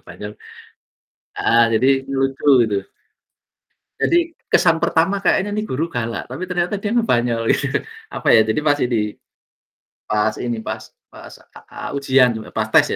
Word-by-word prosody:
ngebanyol 105 0 -9 1.0
heeh, 115 +1 +3
jadi 115 +3 +2 0.3
lucu 135 0 -1 0.2
gitu. 110 -3 0 1.2
Jadi 340 -1 +1 0.2
kesan 165 - +4
pertama 165 +4 +1
kayaknya 200 +2 +2
ini 215 - -1
guru 160 0 -2
galak, 115 -7 -4
tapi 135 +9 -5
ternyata 180 +2 -1
dia 205 +2 -3
ngebanyol 120 - +1
gitu, - - -1 0.3
apa - - -3
ya, - - +7
jadi 110 +6 0
pas 145 -1 +2
idi 115 -6 -1 0.9
pas 105 +1 +1
ini, 120 -1 -2
pas - - -5 0.3
pas, - - -12
e - - -21 0.3
eee, - - -7
ujian, 135 -2 +4
sebe 110 -1 -7
pas 110 0 0
tes - - +6
130 Hz, 150 wpm, -20 LUFS, 115-175 Hz, 1.2 s, ya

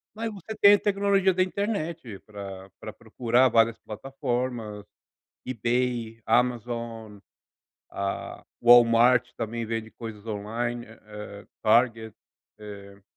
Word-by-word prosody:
mas 225 +1 -3
você 210 +2 -8
tem 205 -1 +7
a - - -2
tecnologia 200 -1 +2
da 185 +1 +3
internet 170 - -3
pra 100 -2 -9
pra - - -8
procurar 125 +2 +2
várias 115 0 +3
plataformas, 120 -2 -4 0.6
eBay, 120 -1 -1
Amazon, 115 -2 -1 0.7
a 100 0 -4 0.2
Walmart 120 +1 +6
também 115 0 -4
vende 115 0 -4
coisas 110 -3 -9
online, 115 +3 -3
eh, 105 -2 -11 0.2
Target, 115 -1 +2 0.4
eh. 100 -1 -11
115 Hz, 105 wpm, -26 LUFS, 110-125 Hz, 0.7 s, tem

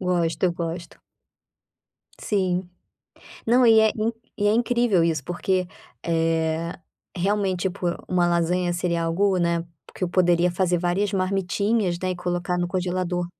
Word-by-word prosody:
Gosto, 175 -2 0
eu 175 - 0
gosto. 170 0 -5 1.3
Sim. 185 -3 -1 0.8
Não, 245 +2 +5
e 220 -1 +7
é 220 -1 +4
in 225 +1 0 0.2
e 205 - 0
é - - +4
incrível 240 -5 +2
isso 160 -4 0
porque, 180 +1 -1 0.4
eh, 165 0 0 0.4
realmente, 195 -1 0
tipo, 190 -1 -2 0.2
uma 180 -1 +2
lasanha 175 +1 +1
seria 170 -1 -1
algo, 190 +3 +1
né, 170 -1 0 0.3
que - - -10
eu 180 - +1
poderia 175 -1 +3
fazer 175 -1 +1
várias 185 +4 0
marmitinhas, 195 +1 0
né, 185 - 0
e 180 - -3
colocar 175 0 -2
no 175 - 0
congelador. 180 -1 -2
180 Hz, 145 wpm, -24 LUFS, 170-195 Hz, 1.3 s, e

